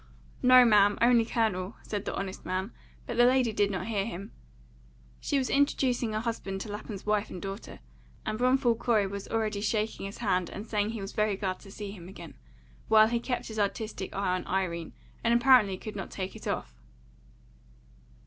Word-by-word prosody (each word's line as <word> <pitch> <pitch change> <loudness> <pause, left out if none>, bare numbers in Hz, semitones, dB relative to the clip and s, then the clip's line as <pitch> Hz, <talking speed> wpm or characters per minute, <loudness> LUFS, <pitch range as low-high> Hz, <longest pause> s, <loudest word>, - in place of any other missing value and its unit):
"No, 255 0 +8
ma'am, 205 -2 +5
only 235 -1 +5
Colonel," 215 -4 -1
said 205 -2 -4
the - - -3
honest 195 -1 -5
man, 185 +4 -2 0.3
but 235 - -5
the 240 - +6
lady 250 -2 +3
did 205 -1 +2
not 190 -3 -3
hear 210 -3 0
him. 200 0 -6 0.9
She 285 - 0
was 260 -2 0
introducing 255 -5 +1
her 215 - -1
husband 200 -4 -3
to 210 - -6
Lapham's 205 -1 -7
wife 210 0 +1
and 180 - -7
daughter, 195 - -7 0.4
and - - -1
Bromfield 250 -2 +3
Corey 220 -4 +2
was 200 0 -5
already 215 -2 -1
shaking 215 -1 -1
his 200 - -9
hand 185 -6 0
and 205 - -7
saying 210 -2 0
he 225 -2 -5
was 195 - -5
very 210 -1 +1
glad 190 -2 -2
to 195 - -13
see 205 0 -6
him 180 -4 -10
again, 170 -4 -10 0.5
while 220 0 +6
he 235 0 0
kept 245 +1 -3
his 220 -1 -5
artistic 205 -1 -2
eye 195 -2 0
on 185 - -3
Irene, 170 -4 -2 0.3
and 235 0 +3
apparently 235 -6 +5
could 215 +3 -8
not 195 - -5
take 190 -1 -5
it - - -8
off. - - -4
210 Hz, 190 wpm, -29 LUFS, 195-230 Hz, 0.9 s, No